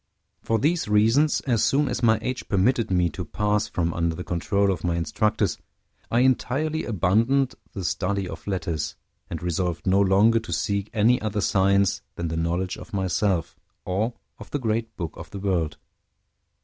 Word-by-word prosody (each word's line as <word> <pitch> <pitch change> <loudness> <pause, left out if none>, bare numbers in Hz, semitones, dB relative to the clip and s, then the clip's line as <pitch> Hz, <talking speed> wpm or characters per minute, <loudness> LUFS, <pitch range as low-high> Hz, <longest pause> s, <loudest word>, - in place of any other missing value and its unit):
For 115 - +1
these 160 +5 +1
reasons, 115 +9 +3
as 120 -5 +1
soon 145 +1 +3
as 125 -2 -2
my 110 -2 +4
age 130 0 -3
permitted 115 +4 +2
me 90 -2 +3
to 90 - -5
pass 105 +4 0
from 85 -1 -1
under 85 -1 0
the 90 - -5
control 100 +4 +1
of 90 -4 -4
my 85 -1 0
instructors, 85 +6 0 0.5
I 120 - +3
entirely 140 +5 +1
abandoned 115 +7 +2 0.2
the 95 - -5
study 100 +2 -1
of - - -9
letters, 85 -5 -2 0.3
and 85 0 -5
resolved 90 0 -2
no 95 +1 +3
longer 100 +4 +4
to 110 - -9
seek 100 0 -1
any 115 +3 +3
other 105 -1 -2
science 100 0 +2
than 85 -1 -3
the 80 - -3
knowledge 85 +3 -1
of - - -12
myself, 95 -2 0 0.3
or 105 +6 -1 0.3
of - - -10
the - - -1
great 115 -3 -2
book 85 -4 -3
of - - -10
the - - -7
world. 90 -6 -1
100 Hz, 175 wpm, -25 LUFS, 90-115 Hz, 0.5 s, my